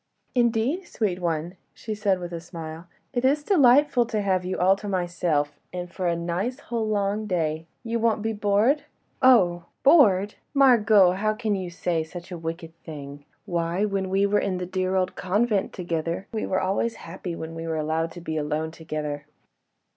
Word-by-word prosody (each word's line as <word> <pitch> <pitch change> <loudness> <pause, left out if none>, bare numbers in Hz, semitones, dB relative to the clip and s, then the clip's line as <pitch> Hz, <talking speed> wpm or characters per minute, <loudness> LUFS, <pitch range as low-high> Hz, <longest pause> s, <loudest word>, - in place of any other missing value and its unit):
"Indeed, 245 +8 +1
sweet 195 -5 -1
one," 170 +1 -2 0.2
she 220 - -5
said 205 -2 +1
with 175 -1 -6
a 165 - -4
smile, 165 -1 -8 0.3
"it 245 - -1
is 285 +3 +3
delightful 280 - +4
to 220 -2 -1
have 185 -2 +1
you 185 +1 -3
all 185 +2 +4
to 205 - -7
myself, 175 -5 -1
and 180 -1 -5
for 185 - -2
a 170 - +2
nice 175 +9 -2
whole 230 -5 -3
long 210 0 0
day.... 160 -3 -1 0.2
You 230 0 -1
won't 225 -2 +1
be 225 0 0
bored?" 210 +7 +2 0.4
"Oh! 180 -10 +5 0.2
bored! 210 - +5 0.2
Margot, 220 -8 +6
how 215 +3 0
can 215 -2 -1
you 190 -3 -3
say 170 -1 -1
such 175 +3 -10
a 175 - -4
wicked 165 0 -6
thing. 145 -2 -9 0.2
Why! 170 +3 0
when 195 -2 -1
we 195 +1 +2
were 205 +1 +2
in 185 -2 -1
the 180 - -3
dear 185 +1 -1
old 185 -1 0
convent 205 +2 +1
together, 170 0 -3
we 220 - -2
were 185 - +1
always 200 +5 0
happy 170 0 -6
when 160 0 -6
we 165 0 -6
were 160 -1 -1
allowed 160 +2 -1
to 175 - -9
be 160 -1 -3
alone 155 +1 -2
together." 150 -3 -5
185 Hz, 185 wpm, -25 LUFS, 165-215 Hz, 0.4 s, Margot